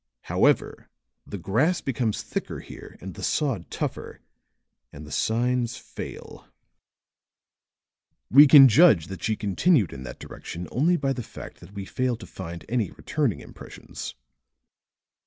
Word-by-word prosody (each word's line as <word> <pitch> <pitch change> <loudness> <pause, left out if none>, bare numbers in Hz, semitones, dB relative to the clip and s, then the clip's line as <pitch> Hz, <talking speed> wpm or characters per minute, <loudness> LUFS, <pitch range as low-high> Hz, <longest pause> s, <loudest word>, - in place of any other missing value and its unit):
"However, - - +1 0.4
the 100 - -6
grass 135 - +1
becomes 120 -5 -2
thicker - - -4
here - - -12
and 95 0 -7
the - - -10
sod 140 -9 -1
tougher, - - -5 0.7
and 75 +1 -10
the 75 - -12
signs 120 +1 0
fail. - - -9 1.8
We 145 +4 +9
can 135 -1 +10
judge 115 - +5
that 95 - -7
she 110 - 0
continued 105 - +2
in 65 - -8
that 65 -2 -8
direction 90 +1 -8
only 165 +8 +2
by 135 -3 0
the 125 - -5
fact - - -10
that 100 - -14
we 100 -1 -6
fail 130 +4 -1
to 115 - -10
find 85 -2 -8
any 115 -6 0
returning 140 - -2
impressions." - - -9
115 Hz, 140 wpm, -25 LUFS, 95-135 Hz, 1.8 s, can